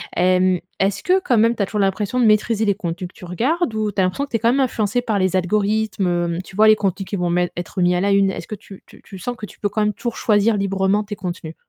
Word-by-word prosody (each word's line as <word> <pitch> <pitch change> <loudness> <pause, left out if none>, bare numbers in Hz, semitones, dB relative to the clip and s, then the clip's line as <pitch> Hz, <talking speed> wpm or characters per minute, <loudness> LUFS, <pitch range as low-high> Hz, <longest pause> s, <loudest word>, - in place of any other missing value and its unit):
Hem, 185 0 +3 0.2
est-ce 195 +1 0
que, 370 +1 +3
quand 245 -9 +1
même, 230 +2 +3
tu 205 - 0
as - - +1
toujours 210 - -3
l'impression 200 +4 0
de 245 - +4
maîtriser 215 0 +2
les 200 - +2
contenus 175 +1 -4
que 175 - -21
tu - - -14
regardes 250 - -1
ou 215 -1 -1
tu 200 - -5
as - - +3
l'impression 185 +10 -1
que 285 - -24
tu - - -1
es 230 - +1
quand 230 +1 +3
même 270 - +1
influencé 235 -3 0
par 220 -4 -1
les 185 0 +1
algorithmes? 185 -3 0
Tu 190 - -14
vois, 215 +1 +5
les 215 - +7
contenus 195 -2 -2
qui 205 - -3
vont 180 -2 -1
mettre 175 0 0
être 175 +1 -4
mis 180 0 +3
à 180 - 0
la 200 +1 +1
une. 195 -1 +4
Est-ce 190 - -6
que 215 - -5
tu 200 -1 -14
tu - - -18
tu 195 - -11
sens 245 +6 -4
que 210 - -6
tu - - -16
peux 205 - -1
quand 215 +2 -1
même 210 0 +1
toujours 235 +1 -5
choisir 210 0 +2
librement 195 +1 +1
tes 210 0 -6
contenus? 175 -4 -6
200 Hz, 295 wpm, -20 LUFS, 185-220 Hz, 0.2 s, les